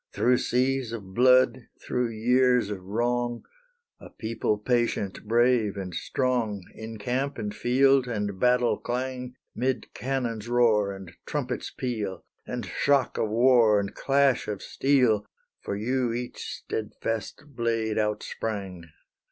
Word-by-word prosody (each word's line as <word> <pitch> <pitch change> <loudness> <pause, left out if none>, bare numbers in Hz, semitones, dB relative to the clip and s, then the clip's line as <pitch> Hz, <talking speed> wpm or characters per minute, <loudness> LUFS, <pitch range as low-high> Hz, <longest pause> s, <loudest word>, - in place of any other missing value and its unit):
Through 125 +1 +3
seas 130 -1 0
of 100 -5 -7
blood, 130 +1 +4
through 125 -1 -1
years 125 0 +2
of 100 -2 -5
wrong, 120 +4 -1 0.6
A - - -12
people 110 -1 -2
patient 110 -3 -1
brave 115 -3 +3
and 95 -2 -5
strong, 110 +1 -1
In 110 0 -8
camp 130 +6 -2
and 105 -3 -4
field, 130 +3 +3
and 105 -5 -3
battle 125 0 +3
clang, 125 0 -4 0.2
'Mid 130 +1 -2
cannon's 120 -5 -3
roar 110 -4 +3
and 95 -3 -9 0.2
trumpet's 125 -4 -3
peal, 105 -8 -4 0.2
And - - -4
shock 140 -3 +1
of 110 - 0
war, 115 -2 +5
and 100 -1 -3
clash 140 -1 +2
of 105 -2 -4
steel, 125 -7 +2 0.4
For - - -3
you 120 +3 0
each 120 +1 -5
steadfast 110 +3 -4
blade 115 -4 -1
out 105 0 0
sprang! 95 -6 -5
120 Hz, 130 wpm, -27 LUFS, 105-125 Hz, 0.6 s, war